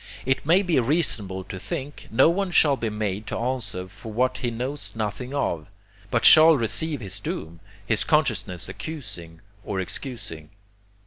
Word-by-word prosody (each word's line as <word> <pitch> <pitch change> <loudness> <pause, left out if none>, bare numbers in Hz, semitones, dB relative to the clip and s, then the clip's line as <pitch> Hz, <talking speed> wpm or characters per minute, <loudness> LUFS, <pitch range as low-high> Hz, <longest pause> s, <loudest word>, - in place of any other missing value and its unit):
It 130 +1 +1
may 180 +5 +5
be 175 -7 +2
reasonable 115 - 0
to 95 - -8
think, 140 +9 -6
no 110 - +5
one 185 +3 +1
shall 155 -4 +5
be 115 -4 -2
made 105 -1 -3
to - - -3
answer 120 -7 -2
for 105 +4 -10
what 130 +3 0
he 120 - -1
knows 130 +5 -4
nothing 110 +4 -3
of, 85 - -2 0.4
but - - +1
shall 160 0 +9
receive 140 +5 -1
his 100 -3 -7
doom, 85 +1 -5 0.3
his 110 0 +1
consciousness 110 - 0
accusing 85 - -8 0.2
or 100 -2 -3
excusing. 95 - -5
120 Hz, 155 wpm, -25 LUFS, 95-145 Hz, 0.4 s, shall